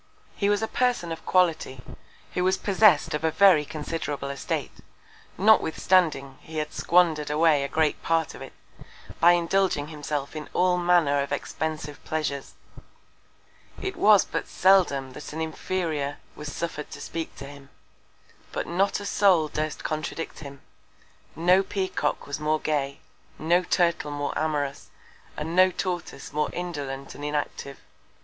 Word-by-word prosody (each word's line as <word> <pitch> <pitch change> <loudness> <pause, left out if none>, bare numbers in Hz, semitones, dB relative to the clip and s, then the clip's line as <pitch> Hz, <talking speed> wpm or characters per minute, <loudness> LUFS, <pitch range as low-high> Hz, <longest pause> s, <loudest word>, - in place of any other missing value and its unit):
He 200 - +1
was 205 +1 +1
a - - 0
Person 245 -9 0
of 165 - -7
Quality, 165 -7 +2 0.5
who 180 - 0
was 190 +1 +2
possess'd 200 -5 +4
of 150 - -2
a 160 - +3
very 165 -1 +5
considerable 150 -2 -4
Estate, 140 - -3 0.7
notwithstanding 170 -8 +3
he 160 0 -9
had 150 0 -3
squander'd 165 -4 +2
away 150 -1 +3
a - - -1
great 155 0 0
Part 165 -1 0
of - - -11
it, - - -9 0.7
by 175 +2 +7
indulging 175 -3 +1
himself 150 -2 -4
in 155 -1 -6
all 180 0 +2
Manner 170 -5 +3
of 140 - -4
expensive 150 0 -4
Pleasures. 145 -3 -3 1.2
It 385 - -4
was 210 -2 +5
but - - -4
seldom 170 -9 +3
that 150 - -9
an 160 - -5
Inferior 160 -3 -2 0.2
was 150 0 -7
suffer'd 160 -3 -5
to - - -9
speak 165 -1 -5
to - - -9
him; 140 -1 -12 0.8
but - - -3
not 190 +5 0
a 205 - -7
Soul 185 -7 +3
durst 155 0 -3
contradict 155 +1 -4
him: 140 -2 -10 0.7
No 180 +4 +4
Peacock 190 -1 -2
was 145 +1 -5
more 155 +1 +1
gay; 140 -3 -2 0.4
no 170 +3 +2
Turtle 170 -4 +1
more 145 0 -3
amorous; 145 -3 -2 0.5
and 160 +3 -4
no 185 +1 +6
Tortoise 175 -7 -5
more 150 0 0
indolent 140 -6 -5
and 145 - -10
inactive. 145 -2 -3
160 Hz, 145 wpm, -26 LUFS, 145-180 Hz, 1.2 s, by